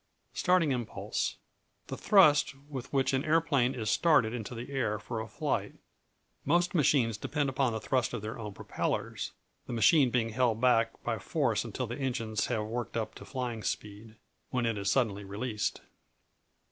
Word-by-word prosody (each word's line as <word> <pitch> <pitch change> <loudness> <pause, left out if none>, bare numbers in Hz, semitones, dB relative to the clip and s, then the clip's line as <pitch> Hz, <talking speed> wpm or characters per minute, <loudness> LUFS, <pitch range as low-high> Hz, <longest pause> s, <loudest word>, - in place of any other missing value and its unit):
Starting 180 -5 +3
Impulse 120 -4 -2 0.5
The - - -5
thrust 150 -9 +5
with 135 -3 -7
which 135 -1 +1
an 130 +1 +1
aeroplane 150 -5 +2
is 110 -4 -4
started 125 -7 +4
into 120 0 -5
the 120 +4 -7
air 120 -6 0
for 110 +2 -5
a 110 - -6
flight. 110 - -2 0.7
Most 175 +5 +2
machines 125 - +3
depend 145 +2 -1
upon 135 -1 +1
the 110 - -2
thrust 125 +3 0
of 105 - -5
their 110 +2 -5
own 105 -2 -5
propellers, - - -3 0.3
the - - -4
machine 125 - +5
being 115 -2 +1
held 115 -1 +1
back 115 -2 +2
by 115 -2 -1
force 125 - 0
until 120 +2 -4
the 120 +4 -6
engines 115 -5 -1
have 110 -3 -1
worked 115 +1 -4
up 110 - -2
to - - -11
flying 125 -4 -4
speed, 105 +2 -5 0.3
when 125 -2 0
it 115 -1 0
is 100 -1 -1
suddenly 105 -4 +1
released. 105 - -3
120 Hz, 170 wpm, -30 LUFS, 110-135 Hz, 0.7 s, thrust